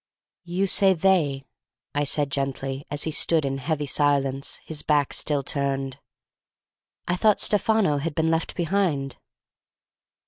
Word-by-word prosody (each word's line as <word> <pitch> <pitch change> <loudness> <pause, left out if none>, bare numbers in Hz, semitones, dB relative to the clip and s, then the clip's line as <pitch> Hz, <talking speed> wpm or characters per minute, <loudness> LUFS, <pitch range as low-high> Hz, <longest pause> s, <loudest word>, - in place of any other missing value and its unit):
"You 180 +3 0
say 195 0 +4
'they,'" 155 -7 +2 0.5
I 145 0 0
said 145 0 -1
gently, 135 0 -3
as 145 0 -2
he 160 - -2
stood 160 0 +1
in 135 0 -2
heavy 150 +2 -2
silence, 140 -1 0
his 155 -2 -5
back 145 -2 +1
still 145 -2 0
turned. 135 -1 -2 1.1
"I 175 - +1
thought 210 +2 +3
Stefano 210 -7 +2
had 155 +1 -3
been 160 0 +1
left 165 0 -1
behind?" 165 -7 0
145 Hz, 135 wpm, -25 LUFS, 140-170 Hz, 1.1 s, say